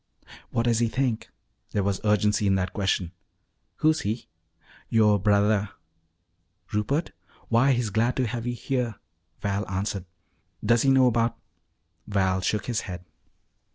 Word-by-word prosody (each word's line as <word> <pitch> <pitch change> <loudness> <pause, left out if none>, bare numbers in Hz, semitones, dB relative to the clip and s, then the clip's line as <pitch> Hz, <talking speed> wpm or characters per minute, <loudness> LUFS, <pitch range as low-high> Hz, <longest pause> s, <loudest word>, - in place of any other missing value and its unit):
"What 115 - 0
does 115 -2 +2
he 120 - +3
think?" 125 -1 -1 0.4
There 100 - +1
was 100 0 -1
urgency 105 0 +2
in 95 - +3
that 95 -1 -1
question. 95 -4 0 0.6
"Who's 155 0 +2
he?" 110 +3 -3 0.6
"Yo' 105 -2 +4
brothah." 105 +1 +2 1.0
"Rupert? 135 +10 0 0.4
Why, 120 +4 +4
he's 120 -4 -1
glad 115 +4 +1
to 130 - +1
have 120 0 -4
you 120 - -1
here," 120 -2 -2 0.5
Val 100 0 -1
answered. 95 0 -2 0.6
"Does 115 +1 +4
he 135 - +3
know 130 -2 +5
'bout 115 0 +1 0.4
" 85 0 -45
Val 95 -1 +2
shook 105 +2 -1
his 115 -2 -1
head. 90 -2 -7
110 Hz, 145 wpm, -26 LUFS, 100-120 Hz, 1.0 s, know